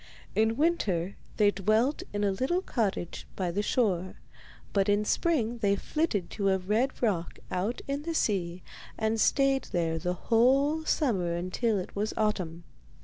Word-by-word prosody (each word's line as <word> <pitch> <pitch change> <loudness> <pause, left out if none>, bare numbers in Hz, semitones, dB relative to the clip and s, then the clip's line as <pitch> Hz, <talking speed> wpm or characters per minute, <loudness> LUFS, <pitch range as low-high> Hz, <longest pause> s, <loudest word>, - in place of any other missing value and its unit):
In 220 +1 +2
winter 200 - +1 0.2
they 205 -1 +5
dwelt 215 +8 +1
in 205 0 -2
a 200 - +3
little 270 - 0
cottage 200 - -2
by 180 -3 -1
the 200 +4 0
shore, 190 -5 0 0.6
but 200 0 +2
in 205 +1 +2
spring 240 -6 +1
they 200 -3 +2
flitted 205 - -1
to 200 -2 0
a 190 - +3
red 215 +9 -1
rock 185 -7 0
out 200 +7 -2
in 280 +1 -2
the 330 +2 -4
sea 180 - 0 0.3
and 220 0 0
stayed 275 -1 +3
there 165 -3 -1
the 180 +2 -1
whole 270 - +3
summer 190 - +1
until 185 +6 0
it 185 - -5
was 210 +2 -2
autumn. 180 -6 -1
210 Hz, 155 wpm, -29 LUFS, 185-250 Hz, 0.6 s, they